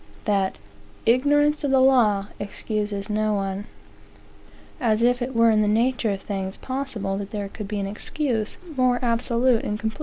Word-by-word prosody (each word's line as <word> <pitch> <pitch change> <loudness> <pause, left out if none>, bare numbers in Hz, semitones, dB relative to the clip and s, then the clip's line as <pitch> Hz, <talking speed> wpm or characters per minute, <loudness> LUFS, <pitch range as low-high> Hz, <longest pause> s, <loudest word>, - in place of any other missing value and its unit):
that 195 -3 +1 0.5
"ignorance 290 +5 +3
of 285 - +1
the 265 0 +4
law 235 -7 +4
excuses 205 0 -3
no 215 0 0
one." 195 0 -3 1.1
As 225 -2 +1
if 245 +1 +3
it 250 +1 -3
were 230 0 +5
in 215 -1 +3
the 210 - +2
nature 235 +2 +1
of 195 -1 -3
things 195 -2 -4
possible 250 -8 -3
that 200 -1 -6
there 205 -2 -4
could 210 0 -7
be 210 0 -3
an 200 - -2
excuse 220 +2 -2 0.2
more 255 -1 +3
absolute 235 0 +2
and 210 0 -3
complete. 220 +5 -4
220 Hz, 170 wpm, -24 LUFS, 205-250 Hz, 1.1 s, were